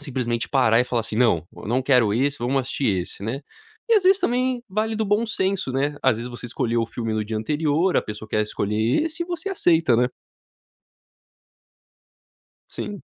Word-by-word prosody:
simplesmente, 125 -5 -2
parar 120 -5 +3
e - - +2
falar 120 -1 0
assim: 110 -1 -5
"Não, 110 -10 +3
eu - - -9
não 125 +4 +1
quero 125 -6 +3
esse, 140 +3 +1
vamos 130 +3 0
assistir 120 -6 -1
esse", - - -9
né, 115 +7 -3 0.5
e, - - +7
às 410 -4 +3
vezes, 385 +1 +5
também 250 -3 0
vale 215 +3 -1
do 220 0 -1
bom 210 +3 +1
senso, 190 -9 -1
né, 145 +2 0
às 130 -4 +3
vezes, 120 +1 -6
você 120 0 -8
escolheu 120 0 -1
o - - -2
filme 115 -1 -4
no 110 -1 -1
dia 110 +1 -4
anterior, 150 +9 +1
a - - +3
pessoa 105 0 -8
quer 105 - +1
escolher 105 - 0
esse 330 +2 -3
e - - -18
você 350 +2 -4
aceita, 165 - +3
né. 125 +1 +3 2.6
Sim. - - -6
130 Hz, 190 wpm, -23 LUFS, 115-190 Hz, 2.6 s, e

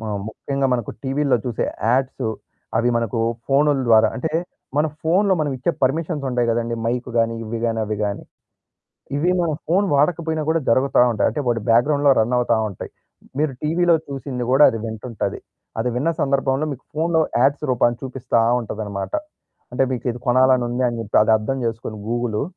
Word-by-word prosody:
మ - - -7 0.2
ముఖ్యంగా 135 +4 -2
మనకు 120 -4 -3
టీవీల్లో 135 -1 +1
చూసే 120 - -1 0.3
యాడ్స్. 130 -1 0 0.5
అవి 120 +2 +2
మనకు 115 0 -1 0.3
ఫోనుల 140 +1 +3
ద్వారా 110 -1 +6
అంటే 145 +5 -2 0.5
మన 150 - +3 0.2
ఫోన్లో 190 +4 +3
మనం 150 - 0
ఇచ్చే 130 +7 0
పర్మిషన్స్ 150 +2 0
ఉంటాయి 120 -1 0
కదండీ. 115 0 -1
మైక్ 125 +2 -2
గాని, 115 0 +2
ఇవి 115 +1 -4
గాని 115 -1 0
అవి 105 0 -3
గాని. 100 -1 -3 0.9
ఇవి 170 +5 +2
మన 170 -2 0 0.2
ఫోను 190 +5 +2
వాడకపోయినా 160 +1 +1
గూడా 165 +1 +2
జరుగుతా 130 +2 +3
ఉంటాయి. 110 - +1
అంటే 120 - -4
వాటి 115 -2 +1
బ్యాక్‌గ్రౌండ్‌లో 140 +5 +4
రన్ 110 +3 +1
అవుతా 120 -1 +2
ఉంటాయి. 100 - -8 0.5
మీరు 150 -2 +1
టీవీలో 170 +2 +3
చూసింది 135 -3 -5
కూడా 135 +3 +6
అది 115 - -3
వింటుంటది. 110 -2 -4 0.4
అది 125 - 0
విన్న 145 +7 +1
సందర్భంలో 135 +1 +1
మీకు 135 -2 -8
ఫోన్లో 160 +1 +1 0.2
యాడ్స్ 140 +3 +2
రూపాన్నా 120 -1 +2
చూపిస్తా 130 -3 -1 0.2
ఉంటాదన్నమాట. 105 -3 -5 0.6
అంటే 125 - +1
మీకు 125 - -4
ఇది 120 - -8
కొనాలని 130 0 +4
ఉంది 120 +2 -2
అని 120 -1 -4
చెప్పి 110 -1 -2
అది 110 +1 +3
అర్థం 110 +5 -2
చేసుకొని 115 -1 -4
గూగులు. 120 -2 -1
125 Hz, 170 wpm, -21 LUFS, 115-145 Hz, 0.9 s, ద్వారా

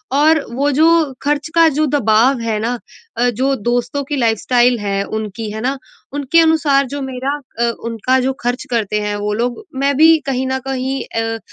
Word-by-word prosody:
और 310 +1 +4
वो 280 +2 +1
जो 305 +4 +3 0.4
ख़र्च 290 0 0
का 330 -1 +6
जो 310 +1 +2
दबाव 235 +2 +3
है 225 -2 -1
ना 235 +2 -2 0.4
अ, 245 +1 +2
जो 260 +4 0
दोस्तों 245 +4 -1
की 290 +2 -4
लाइफ़स्टाइल 240 0 +2
है, 200 -1 -1
उनकी 215 +1 -5
है 220 +1 -5
ना? 265 +3 -1 0.4
उनके 290 +3 +2
अनुसार 310 -4 +3
जो 285 +2 -5
मेरा 265 0 -4 0.3
अ, 235 0 +2
उनका 235 +3 0
जो 260 +1 0
ख़र्च 245 +1 -2
करते 215 -3 0
हैं 210 0 -2
वो 205 0 -2
लोग, 240 - -2
मैं 275 +1 +1
भी 320 +1 +7
कहीं 260 -1 -1
न 265 0 -1
कहीं 265 0 -2
अ, 225 0 -3
255 Hz, 190 wpm, -17 LUFS, 225-280 Hz, 0.4 s, भी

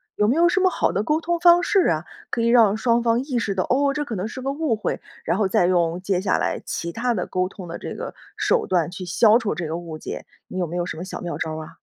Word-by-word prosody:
有 210 - +2
没 245 - +2
有 340 +1 +5
什 370 - +2
么 375 0 +4
好 - - 0
的 200 - -1
沟 305 +7 +1
通 345 +1 -1
方 345 0 +6
式 390 +2 +3
啊？ 160 -1 0 0.3
可 235 - -1
以 230 - +2
让 230 -4 +5
双 235 +1 +2
方 230 0 +2
意 270 -3 -2
识 220 -4 -1
到， 185 - +1
哦， 275 +2 +2
这 295 +1 -1
可 240 -6 -5
能 190 +2 -3
是 250 +3 -7
个 270 +1 -2
误 290 -4 0
会， 215 - -3 0.2
然 170 +3 0
后 205 -2 +2
再 180 - +2
用 175 -1 +1
接 190 -1 0
下 190 0 +1
来 - - -1
其 170 - -4
他 240 +5 -1
的 185 -5 -2
沟 185 0 0
通 185 -1 -10
的 170 - -6
这 - - -6
个 - - -6 0.2
手 475 -2 +1
段， 175 -3 +1
去 180 +1 -7
消 215 +5 +5
除 230 -4 -1
这 170 -2 -3
个 160 - -3
误 165 -2 -7
解， - - -6 0.2
你 - - -7
有 180 - 0
没 170 - -6
有 175 -1 -1
什 175 - -6
么 175 - -5
小 190 - -7
妙 175 -1 -4
招 160 -1 -3
儿 160 - -5
啊？ - - -12
210 Hz, 320 characters per minute, -23 LUFS, 180-255 Hz, 0.3 s, 方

